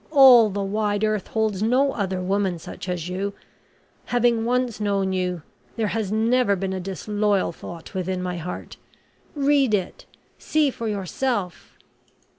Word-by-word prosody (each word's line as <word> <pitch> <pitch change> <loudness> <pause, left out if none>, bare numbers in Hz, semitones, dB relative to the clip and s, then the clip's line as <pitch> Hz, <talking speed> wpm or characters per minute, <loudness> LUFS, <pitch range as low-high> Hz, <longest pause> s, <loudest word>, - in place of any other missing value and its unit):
All 260 -7 +8
the 200 0 -3
wide 205 +1 -1
earth 215 -3 0
holds 220 -3 -1
no 255 +5 +3
other 190 -3 -2
woman 190 -1 0
such 175 +2 -8
as 175 -2 -3
you. 195 +2 -3 0.7
Having 240 -2 +2
once 245 -2 0
known 200 -2 0
you, 180 -3 -2 0.3
there 220 -3 0
has 210 0 -2
never 225 0 +2
been 190 0 -3
a 190 - -3
disloyal 205 +1 -1
thought 170 0 -10
within 185 0 -2
my 180 -1 -3
heart. 175 +2 -7 0.6
Read 280 -5 +3
it 185 -3 -5 0.3
see 305 -3 +1
for 230 -2 -5
yourself." 205 0 -3
205 Hz, 145 wpm, -23 LUFS, 185-230 Hz, 0.7 s, All